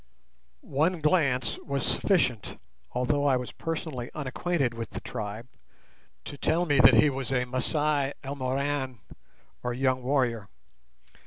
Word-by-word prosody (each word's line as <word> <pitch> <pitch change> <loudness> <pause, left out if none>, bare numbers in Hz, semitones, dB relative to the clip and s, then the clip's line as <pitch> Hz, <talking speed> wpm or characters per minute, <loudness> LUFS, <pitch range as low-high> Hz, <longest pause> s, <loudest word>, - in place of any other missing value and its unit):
One 160 +6 +1
glance 140 -7 +1
was 140 -2 -3
sufficient—although 125 - 0
I 140 -3 +4
was 125 -1 -5
personally 155 -7 -4
unacquainted 145 -1 -1
with 115 0 -5
the - - -6
tribe—to 105 - -10
tell 170 +3 +1
me 145 -4 +2
that - - +8
he 150 - +5
was 135 -1 -4
a 125 -1 +1
Masai 140 +2 0
Elmoran, 135 -1 -2 0.6
or 125 0 -2
young 130 0 +1
warrior. 125 -6 0
135 Hz, 115 wpm, -28 LUFS, 125-145 Hz, 0.6 s, that